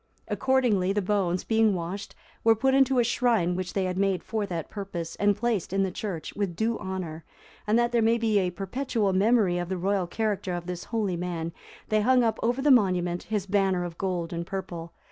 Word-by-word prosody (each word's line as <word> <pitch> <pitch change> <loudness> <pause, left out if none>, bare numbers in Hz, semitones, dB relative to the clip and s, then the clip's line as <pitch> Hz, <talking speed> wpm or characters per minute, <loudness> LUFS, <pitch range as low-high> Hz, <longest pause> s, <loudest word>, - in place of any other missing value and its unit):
Accordingly, 240 -8 +2
the 205 - +1
bones, 185 -3 0
being 220 -3 +3
washed, 180 +4 -5 0.3
were 225 0 +5
put 265 +4 +2
into 270 -1 +4
a 240 - +5
shrine 230 -7 +1
which 185 0 -4
they 195 - 0
had 185 0 -2
made 195 -2 +1
for 215 -2 -2
that 170 -4 -4
purpose, 185 -5 -5
and 205 0 +3
placed 220 -6 -1
in 195 0 +2
the 190 - -1
church, 180 -4 -5
with 200 -4 -2
due 225 +4 0
honour; 180 -4 -5 0.4
and 215 +2 +3
that 240 0 +2
there 235 -1 +2
might 230 +1 +3
be 220 -3 +3
a 185 -2 +1
perpetual 200 +2 -1
memorial 195 -3 +3
of 175 - -5
the 190 - -1
royal 190 0 0
character 200 -1 -2
of 175 -1 -5
this 180 -1 -5
holy 210 -6 -1
man, 170 -2 -3 0.4
they 215 0 +3
hung 250 +2 +4
up 225 -1 0
over 245 +3 0
the 290 - +5
monument 180 -7 +3
his 210 -3 -1
banner 195 -2 +1
of 170 -1 -7
gold 180 -3 -2
and 170 0 -4
purple. 175 -3 -5
195 Hz, 210 wpm, -27 LUFS, 180-225 Hz, 0.4 s, were